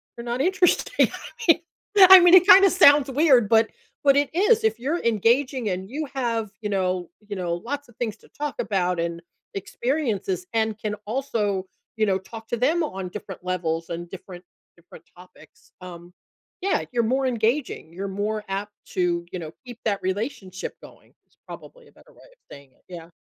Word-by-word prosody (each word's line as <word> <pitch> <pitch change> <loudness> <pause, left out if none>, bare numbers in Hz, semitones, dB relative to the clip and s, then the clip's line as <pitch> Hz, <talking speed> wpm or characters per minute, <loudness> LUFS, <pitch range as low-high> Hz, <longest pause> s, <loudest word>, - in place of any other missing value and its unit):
you're 235 - -9
not 240 +2 -2
interesting. 375 - +2
I - - -8 0.3
mean 330 0 +6 0.5
I 380 -1 +12
mean, 350 0 +5
it 365 -1 +7
kinda 390 -1 +8
sounds 290 -6 +6
weird, 265 -6 +3
but 225 0 +4 0.3
but 275 -1 +5
it 285 -1 +2
is. 430 +5 +3
If 445 - +1
you're 305 +8 -2
engaging 235 +2 +1
and 185 +1 -4
you 295 +4 -4
have, 230 -5 -2
you 210 - -3
know 185 -3 -1 0.2
you 205 - -5
know, 175 -2 -2
lots 280 +9 -6
of 240 - -20
things 225 -4 -3
to - - -22
talk 295 -1 -5
about 180 -3 -1
and 170 0 -3 0.3
experiences 200 - -2
and 220 -1 0
can 215 -1 -4
also, 215 -6 -2 0.3
you 215 - +2
know, 190 -2 +1
talk 225 +4 -11
to 240 - -2
them 315 +8 +1
on 190 -10 -5
different 190 -2 -9
levels 165 -3 -2
and 170 +1 -5
different 180 -1 -11 0.3
different 170 0 -16
topics, 180 0 -19
um 175 -1 -11 0.5
yeah, 390 - 0
you're 240 -1 +1
more 260 +4 0
engaging, 235 - -1
you're 195 +2 -5
more 210 +2 -3
apt 205 +2 -4 0.2
to, 175 -1 -1
you 185 - -5
know, 160 -2 -7
keep 245 -2 -10
that 200 -2 0
relationship 190 -1 -4
going- - - -17
is - - -36
probably - - -12
a - - -21
better - - -22
way - - -23
of - - -25
saying 140 -2 -13
it, - - -35
yeah. 170 -2 -10
220 Hz, 185 wpm, -24 LUFS, 185-275 Hz, 0.5 s, I